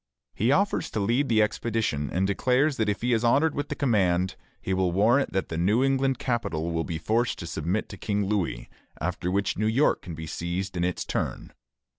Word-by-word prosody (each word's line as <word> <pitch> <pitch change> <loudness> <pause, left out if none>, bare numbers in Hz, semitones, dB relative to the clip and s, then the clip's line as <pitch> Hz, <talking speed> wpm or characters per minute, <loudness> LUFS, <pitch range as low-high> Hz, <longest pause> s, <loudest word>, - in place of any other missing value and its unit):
He 115 +5 +1
offers 200 +7 +1
to - - -3
lead 120 +8 +1
the 110 -2 +4
expedition, 105 -10 -1
and 95 +2 +1
declares 130 +8 +2
that 110 -2 +1
if 105 +2 -2
he 125 0 +2
is 115 0 +1
honored 145 +6 +3
with 145 +1 -3
the - - -2
command, 95 -8 +1 0.2
he 95 - -2
will 95 -1 +1
warrant 115 +10 +3
that 95 - -1
the 80 - -3
New 105 +9 +3
England 135 -1 +2
capital 85 -11 -2
will 80 0 -1
be 85 -2 -4
forced 115 +8 0
to - - -6
submit 85 +6 -2
to 100 - -8
King 105 +1 -1
Louis, 95 -12 -1 0.3
after 90 +1 -2
which 100 +1 0
New 110 - +2
York 125 +7 +2
can 85 - -7
be 80 0 -6
seized 85 +4 -4
in 85 - 0
its 90 0 -1
turn. - - -3
105 Hz, 210 wpm, -26 LUFS, 90-120 Hz, 0.3 s, the